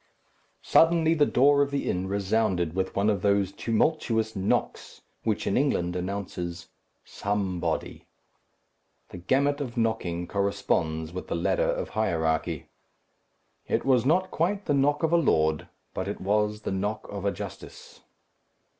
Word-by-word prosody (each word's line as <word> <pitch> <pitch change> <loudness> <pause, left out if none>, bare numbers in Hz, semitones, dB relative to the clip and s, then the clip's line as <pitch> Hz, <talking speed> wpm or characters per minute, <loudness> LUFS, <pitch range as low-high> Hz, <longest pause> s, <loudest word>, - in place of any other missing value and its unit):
Suddenly 165 -1 +4
the 150 -3 +3
door 140 +3 +4
of 140 - +2
the 140 0 -2
inn 90 +1 -1
resounded 100 -4 0
with 95 0 -2
one 100 +1 +1
of 100 -4 +1
those 100 -1 +2
tumultuous 115 -1 0
knocks 95 +1 -2 0.2
which 110 -2 -1
in - - 0
England 90 -11 +1
announces 90 -2 -4 0.4
"Somebody." 100 -3 -3 1.0
The - - -9
gamut 140 +10 +1
of 125 -4 -5
knocking 110 -7 -1
corresponds 85 -5 -1
with 90 - -6
the - - -2
ladder 85 - +1
of - - -2
hierarchy. 80 -7 -1 1.0
It - - 0
was 130 -4 +4
not 180 +7 +2
quite 195 +5 -1
the 145 - +1
knock 145 +2 +2
of 160 +1 +2
a - - +6
lord; 80 - +2 0.3
but - - -3
it - - -4
was 105 +2 0
the - - -3
knock 100 +3 -2
of 100 -1 -6
a 100 - +1
justice. - - -9
105 Hz, 145 wpm, -27 LUFS, 90-135 Hz, 1.0 s, a